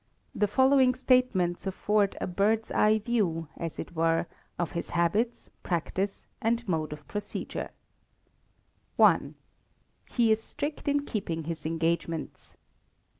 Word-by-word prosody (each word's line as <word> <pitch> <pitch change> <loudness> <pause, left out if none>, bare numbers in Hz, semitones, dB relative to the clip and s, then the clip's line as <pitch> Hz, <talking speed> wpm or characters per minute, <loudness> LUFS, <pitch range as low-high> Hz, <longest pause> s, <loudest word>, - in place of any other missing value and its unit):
The 210 - +1
following 260 +3 +4
statements 250 -10 +2
afford 205 +1 +1
a - - -1
bird's 210 +5 +1
eye 215 +1 +4
view, 200 -8 -1
as 165 -2 -5
it 175 - -7
were, 165 +1 +2 0.3
of 175 - -1
his 170 - -4
habits, 205 +8 0
practice, 190 +3 -2 0.2
and 235 +1 0
mode 160 -4 -1
of 150 -1 -9
procedure: 205 0 -4 1.3
i. - - +7 0.9
He 235 -3 +3
is 220 0 +3
strict 295 +6 -5
in 285 0 +1
keeping 170 - -3
his 160 -1 -4
engagements. 165 0 -2
200 Hz, 125 wpm, -28 LUFS, 165-230 Hz, 1.3 s, i